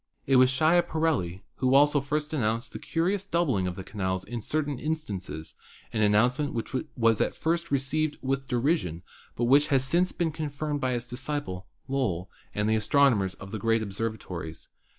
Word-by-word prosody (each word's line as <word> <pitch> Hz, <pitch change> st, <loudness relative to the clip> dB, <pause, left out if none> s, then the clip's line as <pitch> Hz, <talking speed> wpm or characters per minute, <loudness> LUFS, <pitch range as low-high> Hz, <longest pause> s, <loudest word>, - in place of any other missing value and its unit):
It 135 Hz, -1 st, +4 dB
was 130 Hz, 0 st, +6 dB
Schiaparelli 155 Hz, -, +1 dB
who 130 Hz, +1 st, +2 dB
also 145 Hz, +1 st, +5 dB
first 150 Hz, +2 st, -2 dB
announced 115 Hz, -3 st, -1 dB
the -, -, -5 dB
curious 185 Hz, +4 st, 0 dB
doubling 140 Hz, -, +1 dB
of 90 Hz, -, -3 dB
the 95 Hz, -, -6 dB
canals 95 Hz, -2 st, -2 dB
in 120 Hz, -1 st, -5 dB
certain 145 Hz, +1 st, -1 dB
instances, 105 Hz, -, -4 dB, 0.4 s
an 110 Hz, -, 0 dB
announce 105 Hz, +5 st, +3 dB
ment 145 Hz, -3 st, -2 dB
which 115 Hz, +4 st, -4 dB, 0.2 s
was 115 Hz, -2 st, +3 dB
at -, -, 0 dB
first 170 Hz, +1 st, -1 dB
received 145 Hz, +3 st, 0 dB
with 135 Hz, 0 st, -2 dB
derision 120 Hz, -, 0 dB, 0.3 s
but 120 Hz, -, -2 dB
which 140 Hz, +5 st, +5 dB
has 135 Hz, -3 st, +2 dB
since 175 Hz, +7 st, +2 dB
been 170 Hz, -2 st, -1 dB
confirmed 150 Hz, -1 st, -3 dB
by 130 Hz, -1 st, +1 dB
his 120 Hz, -1 st, -2 dB
disciple, 125 Hz, -8 st, -4 dB, 0.2 s
Lowell, 100 Hz, -10 st, -1 dB, 0.2 s
and 105 Hz, 0 st, 0 dB
the 110 Hz, -, +3 dB
astronomers 110 Hz, -4 st, +3 dB
of 95 Hz, -, -10 dB
the 110 Hz, -, -4 dB
great 115 Hz, +1 st, +2 dB
observatories. 95 Hz, -6 st, -5 dB
130 Hz, 170 wpm, -27 LUFS, 105-150 Hz, 0.4 s, was